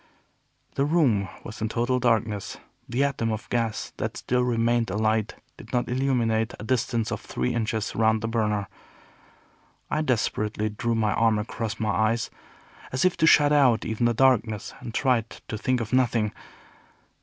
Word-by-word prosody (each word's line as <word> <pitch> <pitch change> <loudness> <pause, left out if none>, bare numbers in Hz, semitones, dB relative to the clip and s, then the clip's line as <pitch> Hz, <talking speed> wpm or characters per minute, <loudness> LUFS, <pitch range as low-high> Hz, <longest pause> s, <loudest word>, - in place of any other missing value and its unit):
The 135 - 0
room 140 - +2 0.2
was 110 - -9
in 110 - 0
total 120 +3 0
darkness. 110 -4 0 0.3
The 125 +4 +1
atom 130 -5 0
of 110 0 -4
gas 115 -3 -2
that - - -3
still 125 0 0
remained 120 -1 +1
alight 110 +2 0 0.2
did 110 - -12
not 125 -1 +1
illuminate 120 -3 0
a - - -7
distance 120 -1 0
of - - -3
three 65 - -2
inches 110 -2 -2
round 110 0 +2
the 115 - -2
burner. 105 -3 0 1.2
I 155 - +1
desperately 110 -5 0
drew 115 +2 -2
my 110 -2 +1
arm 115 -1 +3
across 110 +1 -4
my 110 -1 0
eyes, 110 +2 0 0.6
as 130 +7 +1
if 185 - +3
to 160 -1 +3
shut 145 -2 +6
out 130 -6 +4
even 110 +2 0
the 120 - 0
darkness, 115 -4 +2
and 120 -2 -7
tried 120 -2 +1
to - - -8
think 125 +4 0
of 115 0 -4
nothing. 115 -4 +2
115 Hz, 165 wpm, -25 LUFS, 110-125 Hz, 1.2 s, shut